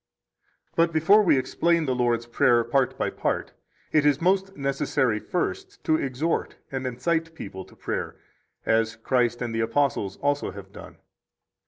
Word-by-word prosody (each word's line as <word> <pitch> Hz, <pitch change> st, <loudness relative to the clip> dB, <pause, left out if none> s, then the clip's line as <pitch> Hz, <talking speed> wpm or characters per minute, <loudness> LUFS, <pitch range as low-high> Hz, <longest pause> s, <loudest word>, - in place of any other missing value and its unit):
4 165 Hz, 0 st, +4 dB
But 165 Hz, -, -14 dB
before 175 Hz, +7 st, +5 dB
we 180 Hz, -8 st, +4 dB
explain 165 Hz, +5 st, +1 dB
the 130 Hz, -, 0 dB
Lord's 120 Hz, -2 st, +1 dB
Prayer 120 Hz, 0 st, +3 dB
part 130 Hz, +2 st, +1 dB
by -, -, -1 dB
part, -, -, -2 dB, 0.4 s
it 155 Hz, -, +4 dB
is 145 Hz, -1 st, +3 dB
most 195 Hz, +2 st, +1 dB
necessary 135 Hz, -4 st, 0 dB
first 390 Hz, -, -4 dB
to 155 Hz, -, +3 dB
exhort 145 Hz, +3 st, -1 dB, 0.2 s
and 130 Hz, -1 st, -3 dB
incite 165 Hz, +6 st, -1 dB
people 95 Hz, -8 st, -7 dB
to -, -, -19 dB
prayer, -, -, -4 dB, 0.5 s
as 110 Hz, 0 st, +2 dB
Christ 120 Hz, +1 st, 0 dB
and 120 Hz, -2 st, -3 dB
the 115 Hz, -, -1 dB
apostles 115 Hz, -5 st, 0 dB
also 145 Hz, 0 st, 0 dB
have -, -, -10 dB
done. -, -, -11 dB
135 Hz, 160 wpm, -25 LUFS, 120-165 Hz, 0.5 s, before